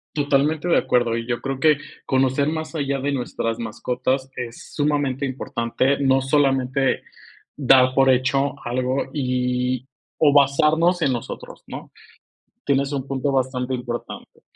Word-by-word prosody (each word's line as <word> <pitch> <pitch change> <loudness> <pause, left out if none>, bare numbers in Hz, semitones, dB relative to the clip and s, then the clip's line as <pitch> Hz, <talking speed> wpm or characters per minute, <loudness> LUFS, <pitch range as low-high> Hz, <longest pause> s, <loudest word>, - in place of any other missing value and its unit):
Totalmente 145 +3 +1
de - - +4
acuerdo. 120 -2 +1
Y 115 - -5
yo 120 -1 -2
creo 135 -1 -3
que 155 0 +4 0.3
conocer 130 +2 +1
más 160 +1 -3
allá 140 -3 -1
de 145 +1 -1
nuestras 120 -3 -3
mascotas 125 +4 -2
es 115 -2 -7
sumamente 145 -2 0
importante, 130 +1 -1
no 135 -1 +3
solamente 135 -1 +1 0.5
dar 130 -2 +5
por 135 0 +4
hecho 135 +2 +2
algo 130 +2 -1
y 125 -1 -1 0.3
o 145 -3 +4
basarnos 155 +5 +3
en 140 - +2
nosotros, 120 - -7
¿no?, - - -9 0.8
tienes 140 0 +1
un 135 -1 -3
punto 135 +1 -1
bastante 130 -1 -1
importante, 120 -1 -7
135 Hz, 135 wpm, -22 LUFS, 125-140 Hz, 0.8 s, dar